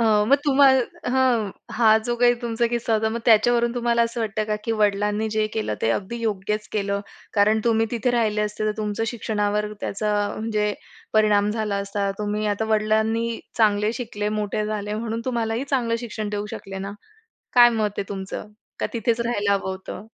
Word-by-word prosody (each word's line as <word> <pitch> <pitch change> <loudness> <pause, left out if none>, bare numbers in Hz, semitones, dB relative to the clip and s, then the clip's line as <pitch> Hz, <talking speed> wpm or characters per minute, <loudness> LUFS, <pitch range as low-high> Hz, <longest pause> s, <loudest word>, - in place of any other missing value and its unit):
अ - - +3 0.2
मग 280 - +6
तुम्हाला 270 -4 +3
हं, 250 -5 +2 0.2
हा 220 -1 +5
जो 240 - 0
काही 240 0 +4
तुमचा 235 0 0
किस्सा 235 -1 0
होता, 220 0 +1
मग 235 - -3
त्याच्यावरून 235 +1 +4
तुम्हाला 235 -1 +2
असं 230 +1 -2
वाटतं 215 -1 -1
का 210 0 -1
की 230 - 0
वडिलांनी 210 +1 +1
जे 215 0 +1
केलं, 215 - -2
ते 110 - +3
अगदी 205 - -2
योग्यच 210 -1 -2
केलं? 200 -1 -1 0.3
कारण 215 +1 +4
तुम्ही 225 -1 +3
तिथे 240 +1 0
राहिले 220 -3 +1
असते, 210 0 -2
तर 215 - +1
तुमचं 215 0 -2
शिक्षणावर 210 -2 -1
त्याचा 210 +1 -2 0.2
म्हणजे 215 -1 0 0.4
परिणाम 210 -1 +3
झाला 215 -2 -1
असता. 200 0 -2
तुम्ही 210 0 -1
आता 205 +1 0
वडिलांनी 220 +2 +1 0.2
चांगले 210 -1 +3
शिकले, 220 -4 -3
मोठे 210 0 -1
झाले, 210 -1 -3
म्हणून 225 +1 -3
तुम्हालाही 235 -1 -1
चांगलं 245 -5 0
शिक्षण 220 -3 -4
देऊ 205 0 -3
शकले 195 0 -7
ना. 195 +1 -5 0.6
काय 240 -1 +9
मत 210 -1 +1
आहे 195 - -3
तुमचं? 195 +1 -6 0.3
का - - 0
तिथेच 230 0 0
राहायला 210 -4 +1
हवं 195 -1 -1
होतं? 190 +2 -7
215 Hz, 180 wpm, -23 LUFS, 210-235 Hz, 0.6 s, काय